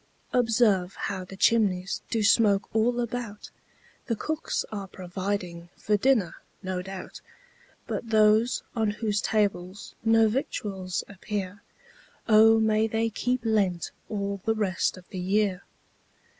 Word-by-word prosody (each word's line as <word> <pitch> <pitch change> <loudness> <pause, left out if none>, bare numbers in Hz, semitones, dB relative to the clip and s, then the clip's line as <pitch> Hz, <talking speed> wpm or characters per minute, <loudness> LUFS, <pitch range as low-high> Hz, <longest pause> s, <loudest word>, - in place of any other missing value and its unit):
Observe 220 -6 +2
how 190 -2 -4
the 190 +1 -10
chimneys 195 -4 +2
Do 225 -2 0
smoke 205 -1 +4
all 240 +2 +2
about; 235 -3 -5 0.6
The 230 - 0
cooks 315 +8 -2
are 200 -2 -5
providing 180 -2 -4
For 210 - +1
dinner, 210 -6 +2 0.3
no 185 -1 -2
doubt; 190 0 -8 0.6
But 230 - -4
those 220 +2 +4
on 220 -2 +1
whose 210 -1 -1
tables 200 -3 -1
No 225 0 +5
victuals 195 -6 -3
appear, 200 0 -5 0.7
O 225 0 +6
may 220 0 +2
they 225 +1 -1
keep 250 +3 -1
Lent 195 -6 +1 0.2
All 200 -2 -3
the 225 0 +1
rest 190 -4 0
of 180 - -14
the 190 - -6
year. 195 0 +1
210 Hz, 130 wpm, -27 LUFS, 190-225 Hz, 0.7 s, O